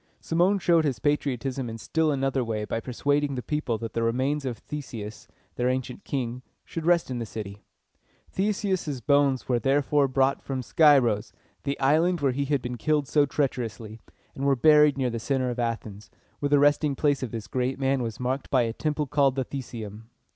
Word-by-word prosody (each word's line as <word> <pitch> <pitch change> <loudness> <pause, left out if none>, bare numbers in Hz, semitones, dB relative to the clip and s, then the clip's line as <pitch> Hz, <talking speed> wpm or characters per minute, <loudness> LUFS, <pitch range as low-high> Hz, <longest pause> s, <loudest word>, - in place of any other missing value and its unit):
Cimon 175 +5 +2
showed 170 -3 +3
his 140 -6 0
patriotism 135 0 -1
in 115 - -6
still 155 +9 0
another 135 -1 0
way 110 -2 -3
by 115 - -2
persuading 145 +4 0
the 125 - -4
people 150 -7 -1
that 115 0 -6
the 115 - -1
remains 130 +5 0
of 125 -3 -3
Theseus, 115 -6 -7 0.3
their 125 +1 +1
ancient 130 +9 -3
king, 125 -3 -3 0.2
should 165 -1 -5
rest 170 -5 +3
in 125 - -2
the 115 - -3
city. 105 -2 -7 0.7
Theseus' 190 -8 -1
bones 140 0 +2
were 125 -2 +2
therefore 140 +2 +2
brought 135 +1 +1
from 130 -2 -4
Scyros, 125 -8 +4 0.3
the 140 0 -2
island 160 +6 +3
where 140 -3 +2
he 140 +2 -1
had 140 -2 0
been 125 0 -4
killed 150 +3 +1
so 145 0 +3
treacherously, 115 -6 -3 0.3
and 135 - -6
were 140 -1 +4
buried 150 +1 +5
near 130 -2 0
the 115 - -3
center 130 +1 -1
of 120 - -5
Athens, 110 -3 -4 0.3
where 145 - -1
the 145 - +5
resting 145 0 +3
place 145 0 +1
of 130 - -3
this 110 -2 -6
great 130 +4 -2
man 135 -1 +1
was 115 -1 -4
marked 130 +2 -2
by 130 -3 +3
a 115 -1 -2
temple 150 +2 -1
called 140 -2 +2
the 135 -1 -1
The 140 - -4
se´um. 110 -4 -8
135 Hz, 195 wpm, -26 LUFS, 120-145 Hz, 0.7 s, buried